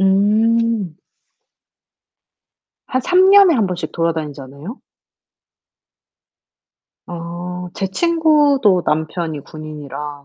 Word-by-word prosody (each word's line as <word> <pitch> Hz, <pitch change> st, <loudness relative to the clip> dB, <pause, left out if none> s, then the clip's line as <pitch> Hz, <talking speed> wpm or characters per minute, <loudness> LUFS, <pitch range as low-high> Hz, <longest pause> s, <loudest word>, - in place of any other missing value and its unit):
음. 210 Hz, -1 st, +1 dB, 1.9 s
한 255 Hz, -, -1 dB
3 365 Hz, +6 st, +4 dB
년에 395 Hz, -4 st, +7 dB
1 225 Hz, -6 st, +1 dB
번씩 175 Hz, -3 st, -5 dB
돌아다니지 160 Hz, -4 st, -2 dB
않아요? 140 Hz, -, -10 dB, 2.3 s
아. 175 Hz, +1 st, -7 dB
제 195 Hz, -, -2 dB
친구도 290 Hz, -, +2 dB
남편이 160 Hz, 0 st, -2 dB
군인이라. 150 Hz, -1 st, -9 dB
180 Hz, 150 characters per minute, -18 LUFS, 160-230 Hz, 2.3 s, 년에